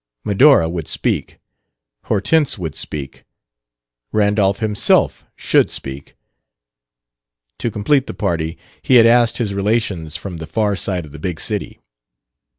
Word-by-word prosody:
Medora 105 - +5
would 85 -2 -4
speak; - - -2 0.7
Hortense 140 +9 +1
would 80 -6 -5
speak; 70 -3 -6 0.9
Randolph 105 -2 +2
himself 110 -2 +1
should - - +2
speak. 70 +1 -7 1.4
To - - -1
complete 130 +7 +1
the - - -6
party 85 -5 -2 0.2
he 130 - +2
had 115 -2 +8
asked 120 0 +4
his 110 -5 -2
relations 100 -6 -1
from 95 -4 -7
the 80 -1 -7
far 105 0 0
side 90 -3 -2
of 75 - -14
the 75 - -10
big 85 +1 -4
city. - - -4
100 Hz, 130 wpm, -18 LUFS, 80-115 Hz, 1.4 s, had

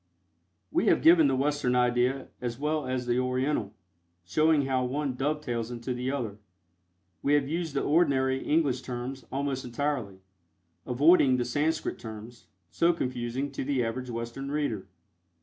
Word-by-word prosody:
We - - +1
have - - +3
given 165 -2 +7
the 135 - +2
Western 140 -2 +1
idea 125 +2 +1
as 120 -1 -3
well 150 +1 -1
as 130 -1 -2
the 120 0 +1
Oriental, 125 -4 -1 0.5
showing 155 - +3
how 130 -1 +1
one 135 +2 -1
dovetails 125 -4 -2
into 120 +1 -4
the 125 +1 -3
other. 115 -7 -3 0.8
We 145 +1 +3
have 140 -2 +1
used 160 -1 -3
the - - +1
ordinary 135 -4 +2
English 145 -5 +1
terms, 125 0 -6
almost 135 -1 -2
entirely, 120 -6 -3 0.7
avoiding 135 0 +5
the 120 - 0
Sanscrit 150 +6 -1
terms, 110 +1 -10 0.2
so 170 +1 +3
confusing 130 -1 -3
to 135 - -4
the 130 -3 0
average 125 +2 -4
Western 115 +4 -5
reader. 140 -9 -2
130 Hz, 150 wpm, -28 LUFS, 120-145 Hz, 0.8 s, given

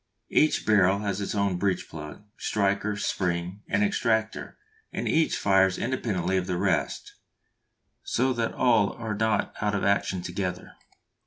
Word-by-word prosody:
Each 155 - +3
barrel 100 -3 +4
has 100 -1 -2
its 100 - -3
own 100 -3 +1
breech 95 0 -1
plug, 75 +3 -9
striker, 100 0 0
spring, 90 -1 -2
and 100 +2 +1
extractor, 110 +1 0 0.3
and - - -3
each 160 0 +2
fires 95 -2 +3
independently 100 -7 -1
of 90 0 -1
the 90 -2 -1
rest, 95 -2 -1 0.9
so 130 +2 0
that 115 -2 -1
all 115 -5 +3
are 115 -2 -4
not 110 -1 0
out 105 -1 0
of 100 - -1
action 95 -2 +1
together. 90 0 -4
100 Hz, 145 wpm, -26 LUFS, 95-110 Hz, 0.9 s, barrel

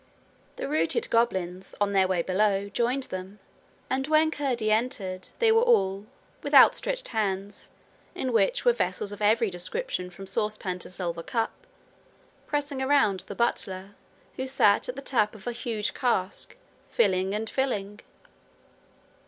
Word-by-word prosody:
The - - -4
routed 310 +10 0
goblins, 190 -5 0
on 205 0 +1
their 190 -1 +4
way 180 -2 0
below, 200 +1 +1
joined 245 +5 0
them, 185 -1 -7 0.5
and 265 +1 -1
when 310 +1 +4
Curdie 250 -8 -1
entered 200 -5 -1
they 455 -2 +4
were 450 +1 +5
all, 200 - +2 0.3
with - - -1
outstretched - - +5
hands, 200 -3 -3 0.5
in 255 -2 -2
which - - +2
were 485 - +6
vessels 205 - -2
of 205 - -9
every 220 0 +3
description 180 - -4
from 185 +2 -10
sauce 210 +2 -1
pan 180 -1 -4
to - - -2
silver 175 -2 -4
cup, 225 +6 -1 1.0
pressing 290 -2 -2
around 265 -8 +3
the 200 - -7
butler, 195 -4 -1 0.4
who 260 - -3
sat 255 -6 +3
at 250 - -4
the 275 - -7
tap 220 -6 +1
of 210 - -13
a 245 - -1
huge 230 -3 -3
cask, 220 - -1 0.3
filling 190 -3 +2
and 220 +1 -3
filling. 210 -6 -2
215 Hz, 150 wpm, -27 LUFS, 190-265 Hz, 1.0 s, were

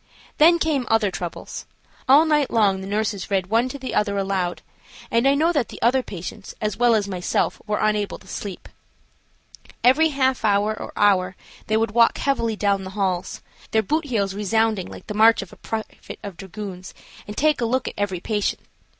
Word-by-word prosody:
Then 335 +3 +7
came 300 -7 0
other 225 -3 +2
troubles. 175 -2 -6 0.4
All 290 +4 +7
night 300 -3 +2
long 200 -4 +2
the 190 - -7
nurses 205 -1 -2
read 190 -1 -1
one 235 +3 +2
to 280 - -6
the 260 -1 -6
other 200 -1 +1
aloud, 190 -3 -2 0.5
and 230 +3 +3
I 275 - +4
know 320 +4 +3
that 280 -7 0
the - - -10
other 255 +3 +4
patients, 195 -1 -8
as 215 -2 -2
well 240 -1 +4
as 205 -2 0
myself, 180 -2 -1
were 210 0 0
unable 210 -1 0
to - - -20
sleep. 200 -3 -7 1.2
Every 270 +6 +5
half 265 -4 0
hour 205 0 +2
or - - -7
hour 190 -3 +3 0.3
they 215 - +2
would 225 -1 0
walk 230 +1 +4
heavily 230 -5 0
down 200 -2 0
the 190 - -6
halls, 185 -2 -2 0.3
their 220 0 +2
boot 310 - 0
heels 205 -8 -1
resounding 210 -1 0
like - - -11
the 210 - -5
march 220 0 +5
of 190 - -14
a - - -14
private 220 -1 -6
of 200 -3 -7
dragoons, 190 0 -8 0.3
and 210 - -8
take 305 -2 +2
a - - +2
look 255 +3 0
at - - -4
every 200 -3 -2
patient. 205 +2 -1
215 Hz, 195 wpm, -23 LUFS, 195-245 Hz, 1.2 s, Then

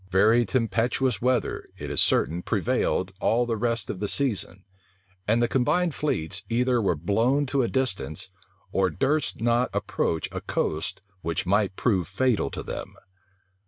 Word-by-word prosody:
Very 110 +5 +4
tempestuous 120 -1 0
weather, 125 -1 0
it - - -6
is - - +2
certain, 85 +3 +2
prevailed 90 - 0
all 120 +2 +2
the 115 -1 -1
rest 115 -1 -1
of 95 - -5
the 105 - -1
season; 105 -7 0 0.6
and 115 +3 +3
the - - +3
combined 160 +8 +1
fleets 80 - -1
either 120 +1 +2
were 95 -5 +1
blown 115 - +1
to 135 0 +1
a 120 - +1
distance, 100 - -2 0.4
or 95 -1 +2
durst 135 - 0
not 120 +2 +2
approach 80 -2 -1
a - - -5
coast 75 +4 -2 0.2
which 85 +2 -2
might 100 +1 +1
prove 95 -9 +1
fatal 115 +5 +1
to - - -6
them. - - -6
115 Hz, 155 wpm, -26 LUFS, 95-125 Hz, 0.6 s, Very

